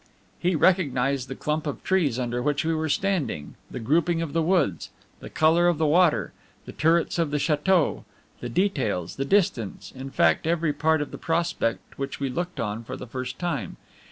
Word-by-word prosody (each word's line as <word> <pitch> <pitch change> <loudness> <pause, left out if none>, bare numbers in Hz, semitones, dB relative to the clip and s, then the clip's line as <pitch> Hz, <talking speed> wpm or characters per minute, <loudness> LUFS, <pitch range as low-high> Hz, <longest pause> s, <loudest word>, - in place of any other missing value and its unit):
He 175 +1 +1
recognized 140 -7 +2
the 135 - -6
clump 150 +2 -2
of 145 - -5
trees 165 -11 +1
under 125 -1 -2
which 145 +3 0
we 165 - +1
were 160 0 -1
standing, 160 - -1 0.2
the - - -6
grouping 165 +7 +1
of 165 -3 -3
the 165 - +2
woods, 160 - +1 0.3
the - - -9
color 165 +2 +3
of 175 -3 +2
the 160 - +1
water, 150 - +3 0.3
the - - -8
turrets 165 +2 +1
of 165 -3 +1
the 150 - 0
chateau, 155 +3 +1 0.4
the 120 - -5
details, 120 - -1
the 135 - -1
distance, 140 - 0
in 130 +1 -7
fact 145 - +2
every 165 -2 +1
part 155 +1 +2
of - - -11
the - - -8
prospect 165 -10 -2
which 135 0 -4
we 140 -1 -1
looked 175 +7 -4
on 105 +1 -3
for 130 +3 -7
the - - -7
first 130 +1 -5
time. 175 -1 -3
150 Hz, 190 wpm, -25 LUFS, 130-170 Hz, 0.4 s, color